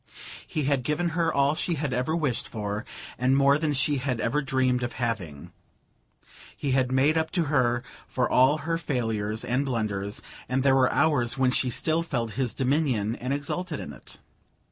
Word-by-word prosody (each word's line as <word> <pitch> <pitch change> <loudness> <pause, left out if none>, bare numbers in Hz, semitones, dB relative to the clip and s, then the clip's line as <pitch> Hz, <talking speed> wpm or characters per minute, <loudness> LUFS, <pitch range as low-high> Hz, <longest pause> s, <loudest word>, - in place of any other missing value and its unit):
He 155 - -2
had 140 -1 +1
given 150 +7 0
her 165 0 0
all 140 +1 +3
she 170 +2 -1
had 145 -3 -2
ever 130 +6 0
wished 150 -8 -1
for, 105 -1 -4 0.3
and 130 +2 +3
more 140 +1 +4
than 155 -1 0
she 145 +1 +1
had 130 -2 -2
ever 145 +7 0
dreamed 130 -2 +1
of 120 0 -3
having: 100 - -4 1.1
he 140 - -2
had 130 -1 +2
made 140 +5 +3
up 160 - -1
to 175 - +2
her 125 -5 +1 0.2
for 125 -2 0
all 130 +4 +4
her 165 0 0
failures 110 -7 -2
and 125 +3 +1
blunders, 105 -6 -2 0.3
and 130 +1 +1
there 135 -1 +5
were 130 -1 +4
hours 130 -7 +2
when 130 -1 +3
she 125 0 +1
still 160 +7 0
felt 120 -9 -2
his 120 0 -2
dominion 130 -6 +1
and 125 +2 -4
exulted 150 +4 -3
in 75 - -7
it. - - -12
130 Hz, 185 wpm, -26 LUFS, 120-150 Hz, 1.1 s, there